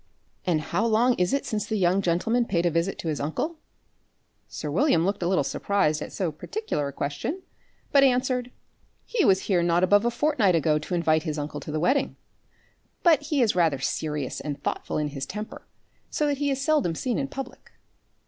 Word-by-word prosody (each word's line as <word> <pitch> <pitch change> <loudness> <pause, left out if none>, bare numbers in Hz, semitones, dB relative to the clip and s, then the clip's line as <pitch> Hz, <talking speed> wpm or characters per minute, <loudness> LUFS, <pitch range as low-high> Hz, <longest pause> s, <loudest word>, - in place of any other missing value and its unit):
"And 165 -4 +2
how 175 +7 -1
long 230 +2 +3
is 180 0 +2
it 275 - 0
since 210 -3 -2
the 220 - -1
young 185 -1 +2
gentleman 210 +7 +1
paid 175 -5 0
a 175 - +3
visit 165 +4 0
to - - -6
his 155 -2 -1
uncle?" 305 - -3 0.9
Sir 150 - -5
William 175 - +3
looked 195 +1 -1
a 170 - 0
little 185 +1 +2
surprized 155 -7 0
at - - -6
so 180 -4 -2
particular 155 - -3
a - - -5
question, 145 - -4 0.5
but 280 -1 +6
answered: 250 -1 +2 0.6
"He 460 -5 0
was 190 0 +4
here 185 -4 +1
not 170 +1 +2
above 205 +3 +5
a 240 - +2
fortnight 240 - +2
ago 155 -1 +2
to 150 +4 -4
invite 160 -2 +2
his 155 -2 -3
uncle 145 0 -4
to 150 - -7
the 155 - -1
wedding. 265 - +1 0.9
But 325 -5 +5
he 285 -5 +3
is 215 - +1
rather 165 -6 +3
serious 150 0 -2
and 145 -2 -5
thoughtful - - -2
in 150 -1 -1
his 135 -2 -5
temper, 210 +2 -7 0.4
so 300 - 0
that 285 -2 0
he 290 -1 +1
is 270 -1 -1
seldom 275 - +1
seen 250 - -1
in 275 - -1
public." 270 -2 -8
190 Hz, 200 wpm, -26 LUFS, 155-255 Hz, 0.9 s, but